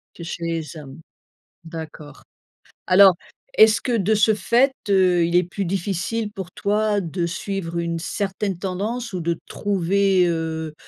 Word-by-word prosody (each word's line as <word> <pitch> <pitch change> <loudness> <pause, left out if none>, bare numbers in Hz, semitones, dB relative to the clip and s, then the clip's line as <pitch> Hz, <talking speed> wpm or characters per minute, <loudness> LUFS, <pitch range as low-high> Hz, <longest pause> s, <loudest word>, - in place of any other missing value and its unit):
Que 170 - -9
chez 170 0 -6
les 165 -2 -4
hommes? 140 -2 -11 0.6
D'accord. 160 -2 -9 0.6
Alors 190 0 +7 0.4
est-ce 220 -1 +6
que 245 -3 0
de 210 +1 +1
ce 215 +1 +3
fait, 235 +7 +3 0.2
heu, 185 -3 +4
il 170 +1 -1
est 180 - +5
plus 190 +3 -4
difficile 195 +4 -2
pour 190 -3 -7
toi 210 +1 0
de 170 0 -3
suivre 170 0 -4
une 170 0 -2
certaine 195 +2 -3
tendance 210 +6 -3
ou 180 -2 -4
de 170 0 -1
trouver, 195 -1 +1
heu, 160 -2 -3
185 Hz, 150 wpm, -22 LUFS, 170-205 Hz, 0.6 s, Alors